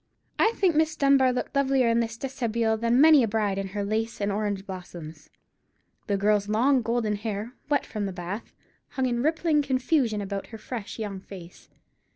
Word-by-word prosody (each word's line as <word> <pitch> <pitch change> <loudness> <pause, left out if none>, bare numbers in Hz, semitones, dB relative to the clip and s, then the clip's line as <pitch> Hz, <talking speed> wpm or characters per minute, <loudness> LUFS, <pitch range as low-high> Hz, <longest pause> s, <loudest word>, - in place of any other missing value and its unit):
I 445 - +4
think 360 -5 +2
Miss 315 +1 +2
Dunbar 275 -3 +4
looked 250 +2 -4
lovelier 270 -2 +3
in 230 0 +3
this 230 -1 -2
déshabille 230 -4 -1
than 235 +2 +3
many 310 -1 +7
a 230 - +2
bride 205 -2 0
in 195 - -3
her 200 +1 -4
lace 220 +2 -2
and 200 0 0
orange 200 -1 -2
blossoms. 175 -5 -9 0.8
The 200 -2 +1
girl's 205 0 +1
long 250 +5 +3
golden 230 -2 -1
hair, 215 +2 -4 0.2
wet 285 -2 +1
from 210 -2 -3
the - - -4
bath, 180 +4 -6 0.4
hung 265 - 0
in 240 -1 0
rippling 310 +1 +2
confusion 260 -4 +1
about 200 -1 -4
her 225 - -9
fresh 220 -1 -7
young 205 -4 -4
face. 180 -2 -12
225 Hz, 185 wpm, -26 LUFS, 200-265 Hz, 0.8 s, many